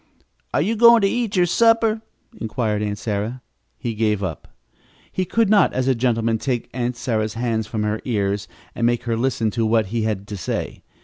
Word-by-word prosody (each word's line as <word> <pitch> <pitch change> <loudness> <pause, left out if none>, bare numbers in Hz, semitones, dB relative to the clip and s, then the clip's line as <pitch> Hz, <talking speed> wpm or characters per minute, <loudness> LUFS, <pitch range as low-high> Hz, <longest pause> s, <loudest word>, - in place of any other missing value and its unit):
"Are - - +2
you 220 +6 0
going 235 +1 +7
to 200 - +4
eat 230 -1 -1
your 180 -1 +4
supper?" 225 +3 +3 0.3
inquired 110 -2 -2
Aunt 105 -1 -2
Sarah. 110 +4 -3 0.3
He 120 - -3
gave 105 -2 0
up. 85 -5 -5 0.6
He 185 - -1
could 225 +5 +2
not, 200 -2 +4
as 130 0 0
a 135 - +4
gentleman, 115 -2 0
take 125 -2 -2
Aunt 125 0 -2
Sarah's 110 -4 -1
hands 115 -2 -1
from 110 -1 -2
her 105 +1 -1
ears 100 -4 -1 0.3
and 115 - +1
make 120 0 0
her 115 -1 -1
listen 115 -2 0
to 115 +2 -1
what 110 0 +2
he 115 - 0
had 105 -2 -2
to 105 - -5
say. 90 - -4
115 Hz, 195 wpm, -22 LUFS, 110-135 Hz, 0.6 s, going